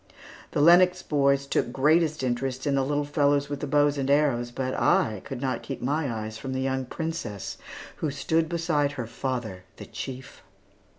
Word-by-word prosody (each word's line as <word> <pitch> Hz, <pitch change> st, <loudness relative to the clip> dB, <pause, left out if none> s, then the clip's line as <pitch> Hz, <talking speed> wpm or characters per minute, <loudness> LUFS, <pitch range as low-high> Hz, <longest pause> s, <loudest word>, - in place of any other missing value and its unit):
The 145 Hz, -, +1 dB
Lennox 180 Hz, +3 st, +6 dB
boys 140 Hz, -2 st, +2 dB
took 130 Hz, -, 0 dB
greatest 155 Hz, +3 st, +2 dB
interest 130 Hz, +1 st, -2 dB
in 140 Hz, -, +1 dB
the 135 Hz, -1 st, +2 dB
little 145 Hz, +1 st, 0 dB
fellows 145 Hz, -1 st, +1 dB
with 145 Hz, -, -4 dB
the 145 Hz, -, -4 dB
bows 145 Hz, 0 st, +2 dB
and 135 Hz, 0 st, -1 dB
arrows, 140 Hz, -5 st, +2 dB
but 130 Hz, +1 st, -3 dB
I 105 Hz, -3 st, +2 dB
could 135 Hz, -3 st, -6 dB
not 130 Hz, -2 st, -1 dB
keep 135 Hz, -, -6 dB
my 145 Hz, +1 st, -1 dB
eyes 110 Hz, -1 st, -5 dB
from 135 Hz, -1 st, -5 dB
the 130 Hz, -, -2 dB
young 130 Hz, 0 st, -1 dB
princess, 160 Hz, -, -5 dB, 0.4 s
who 155 Hz, -, -1 dB
stood 160 Hz, +3 st, 0 dB
beside 160 Hz, -4 st, 0 dB
her 125 Hz, -5 st, -4 dB
father, 115 Hz, -5 st, -4 dB, 0.2 s
the -, -, -9 dB
chief. 130 Hz, 0 st, -8 dB
140 Hz, 180 wpm, -26 LUFS, 130-150 Hz, 0.4 s, Lennox